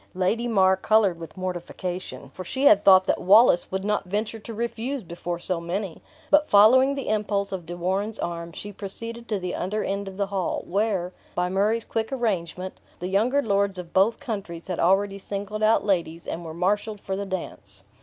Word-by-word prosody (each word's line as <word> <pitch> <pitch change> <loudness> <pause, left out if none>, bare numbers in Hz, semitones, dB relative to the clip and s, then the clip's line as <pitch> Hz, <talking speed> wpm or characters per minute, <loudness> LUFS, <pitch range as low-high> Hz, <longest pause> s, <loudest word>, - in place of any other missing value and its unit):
Lady 215 +6 0
Mar 190 -4 +4
colored 195 -3 +2
with 165 +2 -10
mortification, 180 -4 -5
for 185 - -7
she 260 +9 -3
had 205 -8 +6
thought 190 -1 +7
that - - 0
Wallace 205 -1 +5
would 190 0 -2
not 210 -1 0
venture 210 +4 -3
to 225 - -9
refuse 235 +3 -3
before 175 0 -5
so 175 0 -2
many; 180 +1 -4 0.3
but 295 +1 +5
following 260 +7 +6
the 275 - -5
impulse 205 -2 0
of 180 -4 -5
De 175 +1 -6
Warenne's 195 +5 -1
arm, 170 0 -4
she 205 +5 -7
proceeded 230 +4 -7
to 210 - 0
the 180 -2 -4
other 210 +4 -2
end 200 0 -3
of 190 -1 -8
the 200 - +1
hall, 195 -3 -2
where, 190 -2 -1 0.2
by 180 0 0
Murray's 210 +4 +1
quick 225 +1 -2
arrangement, 185 -7 -2 0.2
the 180 - -4
younger 240 +9 +2
lords 200 -2 +1
of 180 -2 -8
both 200 +4 +3
countries 195 -7 -6
had 180 - -2
already 195 +3 +2
singled 205 +2 -5
out 215 0 +3
ladies, 170 -4 -1
and 170 - -5
were 160 -1 -7
marshaled 205 +4 0
for 195 -1 -4
the 200 +1 -4
dance. 100 - -6
195 Hz, 195 wpm, -25 LUFS, 180-215 Hz, 0.3 s, thought